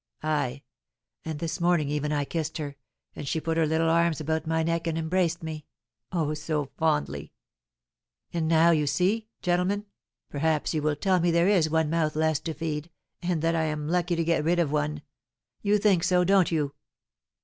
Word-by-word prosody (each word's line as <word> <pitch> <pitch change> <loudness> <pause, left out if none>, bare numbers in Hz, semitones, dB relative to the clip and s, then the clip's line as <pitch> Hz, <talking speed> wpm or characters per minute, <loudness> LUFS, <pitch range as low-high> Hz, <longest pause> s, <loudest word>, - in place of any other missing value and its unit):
Ay, 140 -3 -1 0.6
and 160 -2 -4
this 165 +3 -4
morning 170 -4 +3
even 150 +1 -1
I 145 -1 0
kissed 160 +1 -3
her, 145 -3 -5 0.4
and 145 - -6
she 150 +4 0
put 165 +1 -2
her 165 -1 +2
little 160 +1 +1
arms 170 -1 +2
about 160 +1 -2
my 160 0 +1
neck 165 +1 -1
and 165 -1 -1
embraced 170 0 0
me, 155 -2 -6 0.4
oh, 160 -4 0
so 150 -2 -3
fondly! 75 - -1 1.0
And 165 -2 0
now, 165 +1 +5
you 150 -3 +2
see, 205 +8 +1 0.2
gentlemen, 180 +4 +1 0.4
perhaps 155 +2 0
you 155 - 0
will 150 0 +1
tell 185 +5 +2
me 175 +1 +2
there 170 +1 +3
is 180 -6 +3
one 160 -1 +1
mouth 160 -2 +1
less 155 -2 +2
to 160 -2 -5
feed, 155 -1 -3 0.3
and 175 -3 -1
that 165 0 +2
I 160 -1 +1
am 150 -1 -3
lucky 175 +1 +1
to 165 - 0
get 165 -2 +1
rid 170 +3 +2
of 165 -5 +1
one, 150 0 -1 0.6
you 205 0 +3
think 195 -5 +3
so, 180 -1 +3
don't 190 -1 +4
you?" 150 -4 0
160 Hz, 190 wpm, -27 LUFS, 150-170 Hz, 1.0 s, now